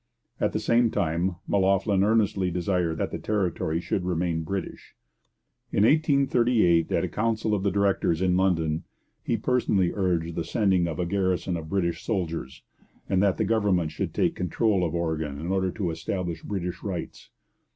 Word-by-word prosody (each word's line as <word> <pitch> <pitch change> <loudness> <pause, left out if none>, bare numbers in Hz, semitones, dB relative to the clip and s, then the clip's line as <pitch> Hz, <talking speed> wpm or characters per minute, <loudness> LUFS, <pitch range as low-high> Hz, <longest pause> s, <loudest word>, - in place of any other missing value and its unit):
At - - +1
the - - 0
same 115 0 +3
time, 85 0 0
M'Loughlin 100 0 +2
earnestly 105 -3 +2
desired 90 -1 -1
that - - -2
the - - -4
territory 90 -6 -1
should 90 +2 -2
remain 85 -2 -1
British. 95 +3 -6 0.8
In 100 - +2
1838, 125 - +3
at - - +1
a - - 0
council 110 0 -1
of 100 - +1
the 100 - +1
directors 100 -4 +1
in 90 -1 +2
London, 80 -4 +1 0.4
he - - 0
personally 105 -8 +1
urged 85 -4 0
the 80 - -2
sending 95 -6 +1
of 80 - -4
a 90 - -1
garrison 95 -1 0
of 80 -2 -6
British 85 -3 -1
soldiers, 85 - -3 0.4
and 95 -1 +2
that 100 -2 +2
the - - +1
government 100 -8 +1
should - - -3
take - - +1
control 95 +2 0
of 85 -1 -1
Oregon 80 -4 -2
in 85 +3 -4
order 95 -1 +1
to 90 -3 -2
establish 85 0 -4
British 90 -3 -4
rights. 95 -4 -6
95 Hz, 165 wpm, -26 LUFS, 85-100 Hz, 0.8 s, same